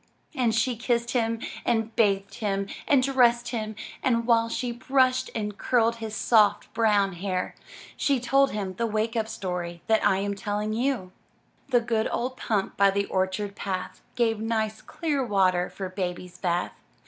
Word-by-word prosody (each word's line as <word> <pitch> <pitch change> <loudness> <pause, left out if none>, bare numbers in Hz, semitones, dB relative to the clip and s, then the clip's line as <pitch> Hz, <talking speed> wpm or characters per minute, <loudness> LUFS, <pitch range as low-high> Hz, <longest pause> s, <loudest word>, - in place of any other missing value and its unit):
And 245 -6 +1
she 240 +2 +1
kissed 235 0 0
him 230 -2 0 0.2
and 225 -1 0
bathed 195 -3 +2
him 200 -2 -1 0.2
and 275 -3 +4
dressed 240 -3 +3
him, 220 -3 -3 0.3
and 235 -2 +1
while 230 -1 +3
she 245 +1 -2
brushed 255 +1 +2
and 210 -2 -3
curled 230 -2 +2
his 220 -1 -5
soft, 210 -2 +3
brown 210 -4 +3
hair, 185 +1 -3 0.4
she 275 -3 +1
told 275 +2 +3
him 195 -3 -3
the 230 - 0
Wake 220 +2 -1
Up 220 -1 0
story 180 -5 -4
that 220 -1 +2
I 190 - +4
am 200 +1 -1
telling 210 +1 -2
you: 235 -5 -1 0.3
— - - -38
The 245 -2 +4
good 225 -1 0
old 250 +2 -2
pump 205 -3 -2
by 200 0 +6
the 200 +1 0
orchard 190 +2 -1
path, 185 -2 -4
Gave 225 -3 +1
nice, 220 -1 -1
clear 295 -5 -2
water 185 -5 +2
for 190 - -5
Baby's 180 -1 -5
bath. 175 -1 -1
220 Hz, 170 wpm, -26 LUFS, 195-235 Hz, 0.4 s, by